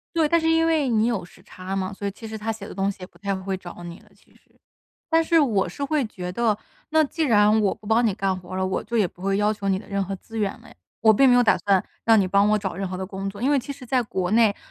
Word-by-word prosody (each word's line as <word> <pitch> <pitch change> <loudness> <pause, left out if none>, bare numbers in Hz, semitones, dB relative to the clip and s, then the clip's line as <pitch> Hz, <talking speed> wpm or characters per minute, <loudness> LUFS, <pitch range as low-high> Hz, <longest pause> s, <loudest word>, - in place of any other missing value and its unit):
对， 320 -2 +3
但 335 +2 +3
是 325 0 +1
因 325 0 +3
为 310 -5 +2
你 225 -1 +2
有 225 -7 -1
时 175 - -16
差 185 +1 -7
嘛， 190 0 -2
所 200 - -7
以 200 - -2
其 225 +3 -10
实 220 0 -6
他 220 +1 -3
写 215 -2 -8
的 - - -9
东 195 +1 0
西 - - -14
也 180 - -8
不 - - -23
太 200 -1 -2
会 190 0 -3
找 175 -1 -10
你 170 0 -8
了， - - -23
其 - - -27
实。 - - -29 0.5
但 325 0 +4
是 330 0 +3
我 215 - +2
是 280 - -6
会 285 -2 0
觉 180 -4 -6
得， 220 0 +1 0.3
那 315 0 +4
既 320 +3 -2
然 215 -4 +4
我 200 - +2
不 210 - -14
帮 230 +2 +3
你 210 - +2
干 195 -1 -1
活 175 0 -12
儿 - - -3
了， 190 - 0
我 190 0 -2
就 235 +2 -2
也 205 - +3
不 175 - -18
会 195 +1 0
要 210 +1 +2
求 200 -2 -5
你 190 0 +1
的 - - -14
任 200 -1 -1
何 195 +1 -4
资 225 +3 -10
源 205 -2 0
了 - - -16
呀。 - - -18 0.3
我 220 -1 +7
并 270 +6 +5
没 - - +6
有 245 - +6
打 220 - +4
算， 195 -2 +2 0.2
让 225 -1 +6
你 190 - +1
帮 200 +2 +3
我 215 - +3
找 195 -4 -4
任 195 +1 -3
何 185 - -5
的 190 - -4
工 195 0 -5
作。 200 +3 -10
因 270 - +2
为 290 - +4
其 270 +3 -6
实 265 -2 -12
在 255 +1 +1
国 190 -3 -3
内， 220 -2 +4
210 Hz, 345 characters per minute, -24 LUFS, 190-235 Hz, 0.5 s, 我